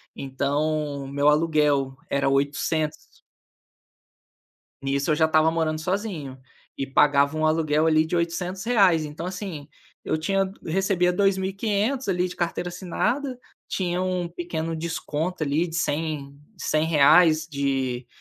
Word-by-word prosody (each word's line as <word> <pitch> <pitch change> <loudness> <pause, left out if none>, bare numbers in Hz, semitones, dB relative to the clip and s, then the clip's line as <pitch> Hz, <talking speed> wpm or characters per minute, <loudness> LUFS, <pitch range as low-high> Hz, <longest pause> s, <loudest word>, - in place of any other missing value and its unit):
Então, 140 +1 -2
meu 145 +2 +2
aluguel 150 -4 +2
era 140 -1 +1
R$800 145 +3 -1 1.6
Nisso 140 +3 -1
eu - - +4
já 160 - +3
estava 160 0 +3
morando 160 -1 -1
sozinho, 175 -8 -3 0.4
e 135 - -3
pagava 140 +2 +3
um 155 - +2
aluguel 155 0 +2
ali 155 0 +4
de 160 - -4
R$800. 180 +1 +1
Então, 150 +3 -7
assim, 180 -6 -6 0.4
eu 155 - -1
tinha 195 +3 0
recebia 180 +1 +1
R$2.500 200 +6 0
ali 180 -1 +1
de 180 - -9
carteira 175 0 -2
assinada, 240 +9 -2 0.3
tinha 180 -1 -1
um 180 -2 -1
pequeno 165 -2 -4
desconto 165 +1 -3
ali 155 +4 +1
de 165 0 -6
cem 145 -3 -2 0.2
cem 155 +1 0
reais 160 +1 +5
de 135 -4 -2
160 Hz, 125 wpm, -24 LUFS, 145-180 Hz, 1.6 s, reais